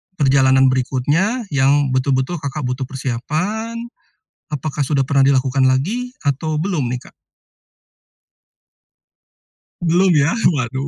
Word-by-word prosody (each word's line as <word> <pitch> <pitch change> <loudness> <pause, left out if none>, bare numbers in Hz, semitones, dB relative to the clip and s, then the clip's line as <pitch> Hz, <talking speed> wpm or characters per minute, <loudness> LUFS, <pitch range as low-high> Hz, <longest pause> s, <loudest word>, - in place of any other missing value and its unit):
perjalanan 130 -3 +4
berikutnya, 145 - 0
yang 140 0 +2
betul-betul 130 +5 0
Kakak 145 +1 -5
butuh 125 +1 -3
persiapan? 155 - -3 0.8
Apakah 150 0 -3
sudah 140 -1 +1
pernah 140 0 +3
dilakukan 135 -1 +2
lagi 210 - -1
atau 150 +2 -1
belum 165 -6 -1
nih 125 0 -4
Kak? - - -37 2.7
Belum 175 +3 +3
ya? 145 +1 +3 0.2
Waduh! 130 +1 -3
140 Hz, 105 wpm, -19 LUFS, 130-160 Hz, 2.7 s, perjalanan